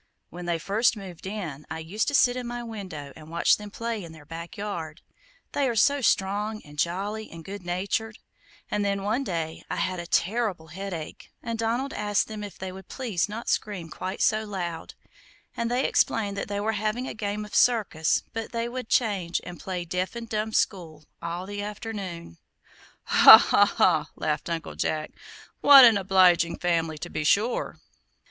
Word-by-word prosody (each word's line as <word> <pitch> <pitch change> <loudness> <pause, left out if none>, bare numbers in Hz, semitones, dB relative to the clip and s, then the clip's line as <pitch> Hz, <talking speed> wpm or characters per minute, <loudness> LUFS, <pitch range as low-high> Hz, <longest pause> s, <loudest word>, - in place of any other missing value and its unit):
When 175 +1 -7
they 170 -1 +1
first 210 +7 +1
moved 190 -3 -9
in, 175 -9 -5
I 160 - -4
used 170 +7 -2
to 285 - +1
sit 245 -2 +5
in 250 -1 -4
my 240 0 -4
window 190 - -7
and 155 0 -13
watch 170 +1 +3
them 210 0 -9
play 230 -1 -4
in 165 -1 -10
their 155 -2 -14
backyard; 170 0 -6 0.5
they 275 -2 +1
are 235 - -2
so 280 +6 +3
strong, 210 0 +1
and 145 0 -12
jolly, 200 +6 -2
and 165 -1 -11
good 200 +1 -7
natured; 200 +5 -2 0.5
and 205 - 0
then, 200 -1 -1
one 220 +7 0
day, 165 -7 -3
I - - -2
had 180 +1 -1
a 170 - -6
terrible 195 -6 0
headache, 175 -3 -7
and 230 -1 -4
Donald 235 +5 -1
asked 205 -1 0
them 215 -1 -6
if 205 - -8
they 190 0 -5
would 190 0 -11
please 210 -8 -2
not 225 +3 -6
scream 185 -6 -2
quite 185 +5 -4
so 215 0 +2
loud, 175 -6 -5 0.6
and 235 0 -1
they 250 +2 +1
explained 205 -3 +1
that 200 - -3
they 205 0 -3
were 215 +2 0
having 215 +4 -2
a - - -4
game 210 -1 -3
of 210 - -14
circus, 205 -10 +2
but 225 0 -3
that - - -17
they 230 0 -1
would 250 -1 -6
change 195 -8 +1
and 175 -1 -9
play 180 -2 -4
'Deaf 180 +5 -2
and 235 -1 -6
Dumb 215 0 -2
School' 165 -8 -1 0.2
all 170 +2 -4
the 205 +1 -5
afternoon." 200 - -6 0.6
"Ha, - - +10
ha, - - +4
ha!" - - +2
laughed 150 +2 -2
Uncle 165 -1 -3
Jack, 155 -1 -2 0.5
"what 275 -2 +10
an 230 -2 +7
obliging 185 -3 +4
family, 165 -3 0
to 175 +3 -7
be 155 - -2
sure." 210 +10 +1
200 Hz, 185 wpm, -26 LUFS, 170-220 Hz, 0.6 s, Ha